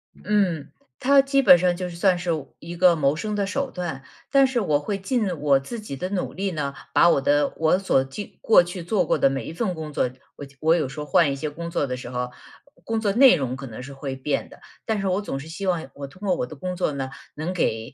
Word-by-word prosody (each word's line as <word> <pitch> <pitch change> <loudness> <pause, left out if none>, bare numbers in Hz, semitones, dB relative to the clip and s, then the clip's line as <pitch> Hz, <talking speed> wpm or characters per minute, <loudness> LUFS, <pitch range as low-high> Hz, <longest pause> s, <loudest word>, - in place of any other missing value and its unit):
嗯， 190 -8 0 0.3
它 275 +1 +5
基 275 0 +2
本 180 -9 +8
上 175 0 +2
就 180 0 -4
是 170 - -9
算 180 +1 +2
是 175 -1 -1 0.3
一 170 +2 -8
个 180 +1 +6
我 - - +2
谋 140 -2 +2
生 210 +6 -3
的 200 -1 0
手 275 +4 -2
段， 170 -7 -5 0.3
但 275 0 +5
是 260 -2 0
我 155 -8 +1
会 195 +7 -3
尽 235 +3 0
我 140 -2 +4
自 235 - -7
己 210 -10 -7
的 180 +6 -4
努 195 -2 -3
力 195 +1 -2
呢， 145 -4 -3 0.2
把 170 - +6
我 140 - +3
的 145 +1 +2
我 160 +3 +3
所 190 -9 +2
就 135 +10 -6 0.2
过 220 - +6
去 175 0 -7
做 180 +1 +1
过 - - +1
的 135 - +4
每 135 0 -3
一 - - -6
份 185 +1 -1
工 155 -2 -7
作， 125 - +1 0.3
我 - - -9
就 140 0 -19
我 160 +2 +4
有 155 -6 -1
时 150 +3 -8
候 150 - -4
换 150 0 +3
一 140 - -2
些 150 +2 -3
工 170 +3 -7
作 145 - 0
的 125 - -3
时 125 -1 -8
候， 125 0 -3 0.5
工 225 -1 -1
作 205 -3 0
内 260 +3 +7
容 130 -2 -2
可 135 0 -8
能 115 0 -8
是 135 +2 -9
会 135 -1 -5
变 135 +2 -2
的。 - - -15 0.3
但 220 -2 0
是 195 - -1
我 185 +2 +1
总 135 -9 -4
是 140 - -9
希 185 +5 -6
望 170 -6 -1
我 140 -1 -7
通 185 +8 -18
过 185 - +3
我 - - -2
的 140 - -10
工 180 +5 -4
作 180 -3 0
呢， 135 -2 -4 0.3
能 160 +5 -3
给 110 -10 -1
170 Hz, 290 characters per minute, -24 LUFS, 140-195 Hz, 0.5 s, 本